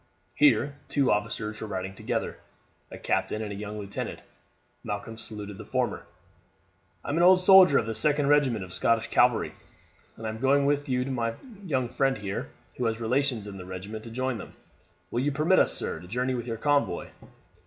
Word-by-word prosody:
Here 145 - +3
two 140 -3 +2
officers 105 0 -2
were 110 - -4
riding 95 -1 -4
together, - - -3 0.5
a - - -9
captain 110 - -1
and 105 - -5
a - - -5
young 105 +1 -6
lieutenant. 100 -1 -5 0.6
Malcolm 105 +2 -5
saluted 105 -3 -6
the - - -6
former. - - -2 1.0
"I - - -5
am 145 - 0
an - - +3
old 180 +1 +7
soldier 185 -5 +7
of - - +1
the 115 - -3
2d 145 +6 +2
Regiment 135 -8 +3
of 90 - -11
Scottish 115 -1 +1
Calvary, 120 -2 +3 0.6
and 115 - -8
am 110 0 -4
going 140 +2 +3
with 145 0 0
my 125 -3 -1 0.3
young 130 -9 0
friend 135 +1 +1
here, 100 -2 -4 0.3
who 125 - -1
has 115 0 0
relations 125 -1 0
in 100 -1 -8
the 90 - -8
regiment, 100 +4 -7
to 115 - -9
join 130 0 -2
them. - - -10 0.6
Will 120 - 0
you 140 +3 +1
permit 155 +6 +3
us, - - +4
sir, - - -3
to 90 - -12
journey 125 +6 -1
with 120 -1 -4
your 115 -1 -3
convoy? 145 -9 0
115 Hz, 185 wpm, -27 LUFS, 105-140 Hz, 1.0 s, old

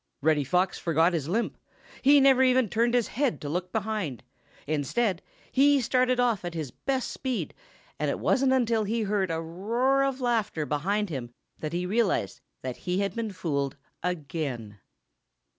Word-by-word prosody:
Reddy 150 -2 +3
Fox 180 +7 +1
forgot 165 +1 +2
his 155 -4 -1
limp. 230 +6 -1 0.4
He 285 +1 +7
never 270 -1 +5
even 255 -2 +4
turned 235 +4 +2
his 240 -3 +2
head 270 0 0
to 145 - -5
look 180 +3 -3
behind. 210 - -2 0.4
Instead, 170 - 0 0.3
he 285 +1 +5
started 255 +1 +2
off 235 -6 +2
at 175 -1 -5
his 155 -6 -4
best 265 - -2
speed, 260 -3 -3 0.5
and - - 0
it - - -1
wasn't 265 0 +2
until 235 -4 +2
he 225 +2 0
heard 200 -2 0
a 165 0 -1
roar 230 +12 +1
of 275 -1 -1
laughter 225 - 0
behind 195 +7 -1
him 125 -5 -4 0.3
that 155 +1 -4
he 175 +1 -1
realized 210 +2 0 0.2
that 130 -1 -4
he 180 0 -2
had 200 - -1
been 230 -2 -2
fooled 140 -7 -2 0.2
again. 145 - -4
200 Hz, 165 wpm, -27 LUFS, 160-245 Hz, 0.5 s, He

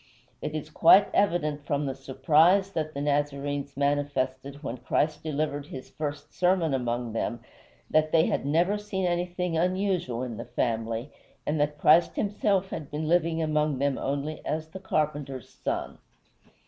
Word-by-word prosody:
It 150 - -4
is 155 0 -5
quite 185 +6 +6
evident 160 -7 +1
from 145 0 -1
the 135 - -2
surprise 155 +9 +3
that 155 -4 -3
the 140 - -3
Nazarenes 145 -1 -1
manifested 140 -1 -1
when 130 -2 -4
Christ 150 +5 0
delivered 145 -2 -2
his 130 -2 -9
first 145 -1 -5
sermon 180 -4 +2
among 120 -2 -2
them 120 +1 -2 0.5
that 155 0 +2
they 160 -1 +5
had - - 0
never 170 +8 +2
seen 195 -2 -3
anything 175 0 -1
unusual 180 -7 0
in 120 -4 -5
the - - -6
family, 115 +1 -2 0.3
and 150 +1 0
that 150 0 0
Christ 160 +3 +5
himself 200 -2 0
had 150 -3 -5
been 150 +1 -3
living 165 -1 +2
among 150 -2 +1
them 140 0 0
only 145 +3 -3
as 155 0 -3
the 190 - -8
carpenter's 145 - -2
son. - - -4
150 Hz, 155 wpm, -27 LUFS, 140-170 Hz, 0.5 s, quite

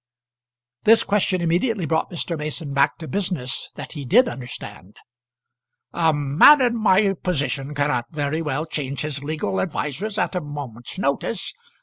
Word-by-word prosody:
This 225 +1 +6
question 195 -3 +1
immediately 180 +4 +1
brought 160 +1 0
Mr. 170 0 -3
Mason 150 -1 -4
back 140 +1 +2
to 160 - -8
business 175 -10 -3
that 145 - -8
he 145 -3 -6
did 235 - +4
understand. 105 - -8 1.0
"A 165 -2 +3
man 145 - +6
in 245 -2 +2
my 200 -3 +3
position 145 -5 -2
cannot 145 -4 0
very 155 0 -2
well 150 0 -2
change 140 -4 -4
his 145 -2 -3
legal 145 -11 -2
advisers 190 - -3
at 200 - 0
a 180 - 0
moment's 145 -3 -8
notice. 185 +4 -2
155 Hz, 145 wpm, -22 LUFS, 140-185 Hz, 1.0 s, This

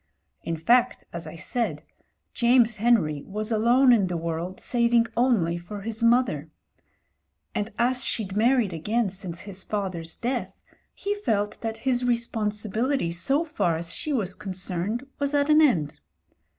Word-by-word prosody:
In 165 0 -3
fact, 240 +9 +3
as 170 0 -5
I - - -8
said, 165 -4 -2 0.5
James 240 -2 +4
Henry 195 -11 +2
was 215 +3 -3
alone 240 +4 +5
in 200 -5 +3
the 175 -1 -2
world 170 +3 -4
saving 235 -1 +2
only 215 -9 +2
for 200 +4 -8
his 220 +2 -3
mother: 230 - +2 1.0
and 210 +2 -2
as 250 +2 +1
she'd 200 -4 -2
married 230 -3 +3
again 205 +6 0
since 180 -3 -6
his 195 -1 -6
father's 185 -6 -4
death 245 +1 -3 0.4
he 405 +1 -2
felt 210 - -1
that 225 -1 -3
his 250 -2 +1
responsibility 225 -1 -1
so 270 - +1
far 175 - 0
as 170 +1 -5
she 310 - -3
was 205 -9 -1
concerned 190 +4 -3
was 285 0 0
at 285 +1 +3
an 305 +1 +6
end. 165 - +2
215 Hz, 150 wpm, -25 LUFS, 180-245 Hz, 1.0 s, an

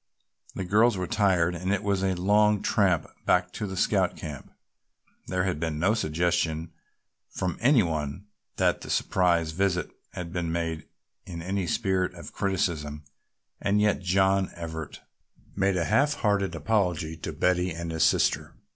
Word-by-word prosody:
The 95 - -3
girls 105 +4 +3
were 90 - -2
tired 90 -3 +2
and 90 +2 -2
it 100 0 0
was 100 -2 0
a 95 -1 +1
long 105 +3 +3
tramp 95 -6 +2 0.2
back 90 0 +2
to 105 - -4
the 95 -1 -6
Scout 95 -2 +1
camp. 75 -5 -8 0.8
There 90 0 0
had 90 -5 -1
been 80 -2 -2
no 95 +7 +2
suggestion 85 -3 0 0.6
from 90 -2 -3
any 125 -2 +5
one 80 +2 -3 0.3
that - - +1
the - - -9
surprise 85 -3 +1
visit 90 +1 0 0.2
had 85 -2 -6
been 85 -2 -2
made 80 -1 -3 0.4
in 85 -2 -6
any 95 0 -2
spirit 95 -5 0
of - - -10
criticism 80 -6 -2 0.6
and 100 +1 +2
yet 105 0 +2
John 95 +1 +2
Everett 80 -3 -7 0.5
made 95 -1 +1
a 85 - 0
half 145 - +2
hearted 100 -5 0
apology 90 -7 0
to - - -5
Betty 90 0 +1
and 85 0 -5
his 80 -1 +1
sister. - - +2
90 Hz, 155 wpm, -27 LUFS, 85-100 Hz, 0.8 s, any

